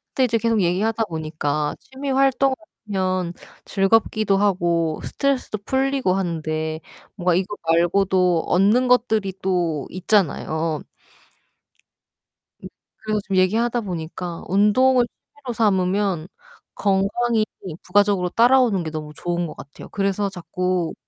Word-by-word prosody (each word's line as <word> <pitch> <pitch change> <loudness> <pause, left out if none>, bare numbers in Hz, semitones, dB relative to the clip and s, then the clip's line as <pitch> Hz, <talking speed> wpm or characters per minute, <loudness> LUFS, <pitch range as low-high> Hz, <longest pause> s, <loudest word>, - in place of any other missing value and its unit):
근데 265 - +3
이제 230 -1 +1
계속 225 -2 +1
얘기하다보니까 165 -6 -1
취미 270 +1 -7
활동을 270 0 +3 0.3
하면 185 -3 -1 0.3
즐겁기도 200 0 +2
하고 175 -5 +1
스트레스도 275 -6 -1
풀리고 265 -7 +1
하는데 160 -3 -2 0.4
뭔가 180 -3 +1
이거 190 +3 -1
말고도 180 0 +2
얻는 210 +8 +3
것들이 220 -6 +2
또 175 -6 -1
있잖아요. 165 -4 0 2.2
그래서 215 -1 0
지금 195 -1 -4
얘기하다 230 +6 +2
보니까 175 -2 -6
운동을 240 +6 +4
취미로 270 -4 -10
삼으면 190 -5 +1 0.5
건강이 215 +3 +1 0.4
부가적으로 195 -1 +2
따라오는 235 -5 +4
게 155 - -5
너무 155 -1 -6
좋은 175 0 -2
것 150 - -9
같아요. 140 - -12
그래서 200 0 -1
자꾸 180 -1 -2
195 Hz, 290 characters per minute, -22 LUFS, 175-225 Hz, 2.2 s, 운동을